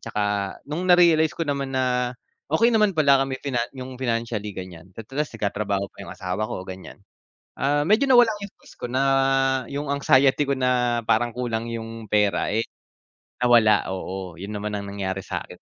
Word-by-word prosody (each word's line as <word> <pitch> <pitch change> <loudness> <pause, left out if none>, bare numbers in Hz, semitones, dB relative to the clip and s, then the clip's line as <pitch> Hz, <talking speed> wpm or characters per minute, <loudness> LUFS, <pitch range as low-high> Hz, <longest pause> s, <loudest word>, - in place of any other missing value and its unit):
tsaka 105 -2 -2
nung 170 +6 -4
narealize 170 -3 +5
ko 165 - -1
naman 140 -2 -2
na 125 -1 +1 0.4
okey 230 +10 +3
naman 215 -2 +4
pala 140 -3 +5
kami 135 -1 -3
finan 120 -4 -2
yung 130 0 -7
financially 115 -4 -2
ganyan 90 -2 -9
at 115 - -7
ras 150 +2 -1
nagtatrabaho 100 -1 -1
pa - - -14
yung - - -10
asawa 95 +4 -3
ko 90 - -5
ganyan, 95 0 -9 0.6
ah, 145 +2 +1
medyo 215 - +3
nawala 245 -3 +6
yung 200 -1 -8
stress - - -18
ko - - -4
na 130 +2 0 0.6
yung 140 0 -4
anxiety 140 0 +3
ko 140 - +1
na 125 -2 +1
parang 115 +1 +1
kulang 115 -2 -2
yung 115 -1 -6
pera 105 -3 +2
eh 115 - +2 0.8
nawala, 120 -3 +5
oo 95 -2 -6
yun 100 +2 -6
naman 105 +1 -3
ang 100 0 -5
nangyari 95 -1 -3
sakin. - - -5
120 Hz, 175 wpm, -24 LUFS, 105-140 Hz, 0.8 s, nawala